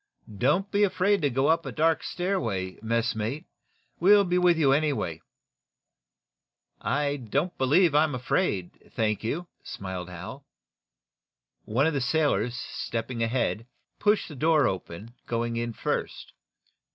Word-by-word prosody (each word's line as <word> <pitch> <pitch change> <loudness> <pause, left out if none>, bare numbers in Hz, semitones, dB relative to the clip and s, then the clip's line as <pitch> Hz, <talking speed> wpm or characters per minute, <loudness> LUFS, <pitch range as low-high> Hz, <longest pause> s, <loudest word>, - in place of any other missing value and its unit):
"Don't 150 - +1
be 205 - +1
afraid 200 0 +2
to 145 - +2
go 135 +2 0
up 165 +2 +3
a - - -5
dark 160 +1 +2
stairway, 115 - -2
messmate. 115 +5 -1 0.5
We'll 200 +3 +6
be 180 -1 +1
with 175 -2 +4
you, 145 -4 +4
anyway." 135 - 0 1.6
"I 145 +1 0
don't 140 - -2
believe 150 +5 +4
I'm 150 -1 +3
afraid, 120 - -2
thank 105 -2 0
you," 165 +10 -3 0.2
smiled 95 -2 -6
Hal. 90 +10 -8 1.2
One 120 +7 +1
of 160 - +1
the 140 - 0
sailors, 125 -5 +1
stepping 115 0 -4
ahead, 115 -1 -1 0.3
pushed 205 -9 +1
door 155 -2 +4
open, 95 +4 -5
going 115 0 -1
in 120 0 -2
first. - - -4
135 Hz, 125 wpm, -27 LUFS, 115-165 Hz, 1.6 s, We'll